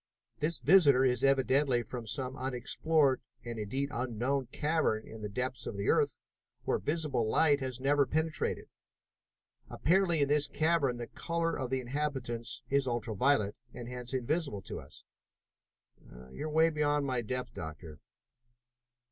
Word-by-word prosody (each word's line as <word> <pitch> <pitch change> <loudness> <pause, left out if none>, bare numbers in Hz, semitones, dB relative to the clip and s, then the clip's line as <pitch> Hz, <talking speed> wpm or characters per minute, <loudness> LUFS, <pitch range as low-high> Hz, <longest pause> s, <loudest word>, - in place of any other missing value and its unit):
This 160 +3 -1
visitor 145 -6 +6
is 125 -1 +2
evidently 135 -2 +3
from 120 0 -7
some 130 +4 -3
unexplored 135 +2 +1 0.2
and, 120 -1 -5
indeed, 130 +7 -2
unknown 130 +2 -1
cavern 150 -5 0
in 110 - -10
the 105 - -4
depths 125 +4 -3
of 100 - -5
the 100 - -1
earth - - +2 0.5
where - - 0
visible 145 - 0
light 145 +2 +4
has 130 -2 -4
never 140 +1 +3
penetrated. 160 +1 -1 1.0
Apparently 175 -3 +2
in - - +1
this 145 0 +2
cavern 155 -6 +1
the 120 - -4
color 165 +5 -2
of 130 -3 -3
the 130 0 0
inhabitants 125 -4 -3
is 140 0 +1
ultra 120 -2 -2
violet, 110 -3 +2 0.2
and 120 -1 -7
hence 125 -1 -6
invisible 130 - -1
to - - -6
us." - - -12 1.3
"You 155 - -5
are 165 +1 +5
beyond 145 -1 +1
my 130 -3 0
depth, 125 +3 -4
Doctor." 80 -1 -8
130 Hz, 145 wpm, -31 LUFS, 120-150 Hz, 1.3 s, visitor